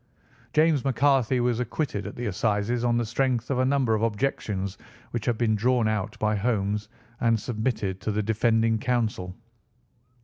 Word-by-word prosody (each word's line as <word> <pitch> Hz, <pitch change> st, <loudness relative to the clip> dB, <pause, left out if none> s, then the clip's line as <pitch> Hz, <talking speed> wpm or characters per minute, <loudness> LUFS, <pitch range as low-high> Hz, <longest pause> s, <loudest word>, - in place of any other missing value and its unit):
'" -, -, -30 dB
James 155 Hz, -3 st, +3 dB
McCarthy 135 Hz, -2 st, +2 dB
was 120 Hz, -1 st, +1 dB
acquitted 120 Hz, -5 st, -2 dB
at 100 Hz, -, -7 dB
the 120 Hz, -, -4 dB
Assizes 105 Hz, +3 st, 0 dB
on 120 Hz, -1 st, +2 dB
the 120 Hz, -, 0 dB
strength 125 Hz, +1 st, 0 dB
of 130 Hz, -, +1 dB
a 130 Hz, -, +3 dB
number 130 Hz, -4 st, +2 dB
of 110 Hz, -, +1 dB
objections 105 Hz, -4 st, -1 dB, 0.4 s
which 120 Hz, -1 st, -4 dB
had 120 Hz, -2 st, +1 dB
been 115 Hz, -2 st, +2 dB
drawn 120 Hz, +2 st, +2 dB
out 110 Hz, -3 st, -2 dB
by 105 Hz, 0 st, +1 dB
Holmes 105 Hz, -1 st, -1 dB, 0.3 s
and 115 Hz, -2 st, +2 dB
submitted 110 Hz, -4 st, -2 dB
to 110 Hz, -, -1 dB
the 105 Hz, +1 st, -1 dB
defending 115 Hz, +1 st, +2 dB
counsel. 110 Hz, -7 st, -1 dB
115 Hz, 170 wpm, -26 LUFS, 105-125 Hz, 0.4 s, James